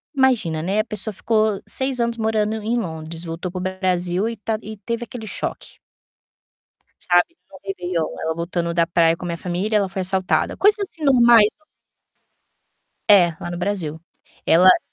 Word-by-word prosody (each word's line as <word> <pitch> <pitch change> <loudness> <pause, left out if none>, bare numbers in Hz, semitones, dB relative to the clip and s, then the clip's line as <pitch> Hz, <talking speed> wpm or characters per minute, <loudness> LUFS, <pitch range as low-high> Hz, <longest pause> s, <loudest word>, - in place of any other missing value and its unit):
imagina, 230 - +2
né, 195 +5 0
a 215 - +3
pessoa 215 -1 -3
ficou 215 0 0
6 265 -1 -1
anos 235 0 0
morando 220 -1 0
em 220 +2 -2
Londres, 160 -4 -5
voltou 170 +2 -5
para 185 - -5
o - - -5 0.2
Brasil 180 +2 0
e 230 - -4
ta 220 +1 -3
e 215 +1 -7
teve 235 +3 -4
aquele 225 -1 -8
choque. - - -5 1.2
Sabe, 175 - +3 0.2
no 195 - -15
Réveillon, 180 -4 -2
ela 160 0 -1
voltando 170 0 -2
da 170 0 +2
praia 165 -1 +3
com 180 - -9
minha 170 -1 -3
família, 185 +5 -1
ela 200 -2 +1
foi 190 0 -3
assaltada. 185 0 +1
Coisas, 415 +2 +4
assim, 335 -5 -6
normais 240 -5 +6
no 310 - -33 1.4
É, 175 -5 +6
lá 175 - -6
no 175 - -5
Brasil. 175 -4 -2 0.5
Ela 180 +3 +6
195 Hz, 170 wpm, -21 LUFS, 175-225 Hz, 1.4 s, normais